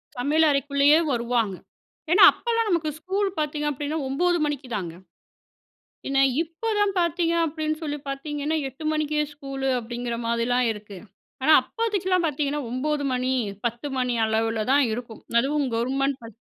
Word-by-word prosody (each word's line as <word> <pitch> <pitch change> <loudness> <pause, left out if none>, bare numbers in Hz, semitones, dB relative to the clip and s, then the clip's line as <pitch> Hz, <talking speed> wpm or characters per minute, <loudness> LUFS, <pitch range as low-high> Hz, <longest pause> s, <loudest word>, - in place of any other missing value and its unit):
சமையல் 295 +6 +2
அறைக்குள்ளேயே 280 +2 +4
வருவாங்க. 235 -4 0 0.6
ஏன்னா 360 - +7
அப்பலாம் 460 -2 -1
நமக்கு 335 -4 +1
ஸ்கூல் 390 +4 -1
பார்த்தீங்க 295 0 -1
அப்படின்னா 290 +3 -3
9 350 +6 +1
மணிக்குதாங்க. 245 - -4 1.2
என்ன 275 0 +2 0.2
இப்போ 335 +8 -6
தான் 410 -1 +2
பார்த்தீங்க 340 0 +1
அப்படின்னு 310 0 -2
சொல்லி 295 -1 -3
பார்த்தீங்கன்னா, 295 +2 -3
8 270 +4 -11
மணிக்கே 305 0 0
ஸ்கூல் 275 -2 -5
அப்படிங்கிற 240 +1 -4
மாதிரிலாம் 235 +2 +1
இருக்கு. 210 -2 -10 0.5
ஆனா, 310 - +5
அப்போதைக்குலாம் 380 -6 -1
பார்த்தீங்கன்னா 295 -1 -1
9 285 +3 -1
மணி 255 +1 0 0.3
10 235 +4 -3
மணி 250 -1 0
அளவுல 220 0 0
தான் 280 0 +5
இருக்கும். 230 -1 -7 0.2
அதுவும் 285 +2 0
கவர்மெண்ட் 270 +3 0
பாத் 230 -1 -11
285 Hz, 135 wpm, -25 LUFS, 245-315 Hz, 1.2 s, ஏன்னா